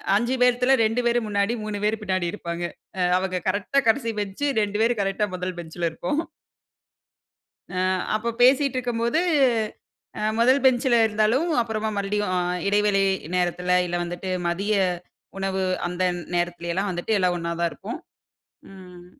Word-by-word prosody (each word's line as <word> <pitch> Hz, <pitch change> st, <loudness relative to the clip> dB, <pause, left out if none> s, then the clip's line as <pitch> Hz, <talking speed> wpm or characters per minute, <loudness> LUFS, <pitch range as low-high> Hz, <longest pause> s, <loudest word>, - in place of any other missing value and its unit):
5 240 Hz, +5 st, +1 dB
பேத்துல, 250 Hz, +2 st, +4 dB
2 225 Hz, +3 st, +1 dB
பேரு 240 Hz, 0 st, +3 dB
முன்னாடி, 205 Hz, +2 st, 0 dB
3 210 Hz, -1 st, -4 dB
பேரு 215 Hz, +1 st, 0 dB
பின்னாடி 185 Hz, -3 st, -1 dB
இருப்பாங்க. 170 Hz, -4 st, -5 dB, 0.4 s
அ -, -, +1 dB, 0.2 s
அவுங்க 185 Hz, -1 st, -2 dB
கரெக்ட்‌டா 240 Hz, +7 st, +1 dB
கடைசி 230 Hz, -1 st, +1 dB
பெஞ்ச், 200 Hz, +6 st, -5 dB, 0.2 s
2 205 Hz, 0 st, -1 dB
பேரு 235 Hz, +1 st, +2 dB
கரெக்ட்‌டா 195 Hz, +2 st, 0 dB
மொதல் 180 Hz, 0 st, -4 dB
பெஞ்சுல 170 Hz, 0 st, -3 dB
இருப்போம். 180 Hz, -, -2 dB, 1.5 s
அ -, -, -2 dB, 0.4 s
அப்ப 230 Hz, +2 st, -1 dB
பேசிட்டுருக்கும்போது, 255 Hz, -1 st, +3 dB, 1.0 s
அ -, -, -3 dB, 0.2 s
மொதல் 260 Hz, +4 st, +4 dB
பெஞ்ச்சில 250 Hz, -1 st, +4 dB
இருந்தாலும், 220 Hz, +9 st, +1 dB
அப்பறமா 220 Hz, -1 st, -2 dB
மறுபடியும் 200 Hz, -1 st, -1 dB
அ -, -, +2 dB, 0.3 s
இடைவெளை 205 Hz, -1 st, +3 dB, 0.3 s
நேரத்துல 180 Hz, 0 st, 0 dB
இல்ல 175 Hz, 0 st, -3 dB
வந்துட்டு, 175 Hz, +2 st, -5 dB, 0.2 s
மதிய 200 Hz, +5 st, 0 dB, 0.6 s
உணவு 190 Hz, 0 st, -1 dB, 0.2 s
அந்த 180 Hz, +1 st, -2 dB, 0.3 s
நேரத்துலயலாம் 175 Hz, +2 st, -1 dB
வந்துட்டு 180 Hz, +5 st, -1 dB
எல்லாம், 180 Hz, -1 st, +2 dB
ஒண்ணாதான் 170 Hz, 0 st, -1 dB
இருப்போம். 225 Hz, +10 st, -7 dB, 0.7 s
ம் 180 Hz, -2 st, -13 dB
205 Hz, 135 wpm, -24 LUFS, 180-235 Hz, 1.5 s, பேத்துல